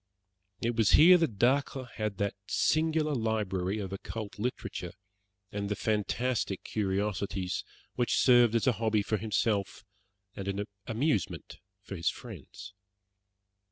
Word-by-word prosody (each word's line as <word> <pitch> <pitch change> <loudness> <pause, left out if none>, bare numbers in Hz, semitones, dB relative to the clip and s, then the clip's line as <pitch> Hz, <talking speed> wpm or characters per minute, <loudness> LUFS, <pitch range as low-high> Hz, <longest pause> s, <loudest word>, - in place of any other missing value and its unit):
It 120 0 0
was 110 -2 +3
here 175 +4 +9
that 140 -11 0
Dacre 130 +2 +1
had 105 -2 -3
that 100 0 0
singular 155 +3 +1
library 105 -5 -1
of 100 -2 -4
occult 105 +1 -6
literature, 105 -6 -4 0.6
and 100 -1 -3
the 105 - 0
fantastic 110 0 -1
curiosities 100 -2 -2 0.3
which 120 -1 +1
served 120 -3 +5
as 115 - +2
a 130 - +5
hobby 110 -2 +2
for 110 +2 0
himself, 105 -2 -1 0.5
and 100 - -6
an 100 +1 -2 0.2
amusement 115 - -1 0.2
for - - -7
his 85 -1 +1
friends. 100 -1 -10
110 Hz, 125 wpm, -30 LUFS, 100-120 Hz, 0.6 s, here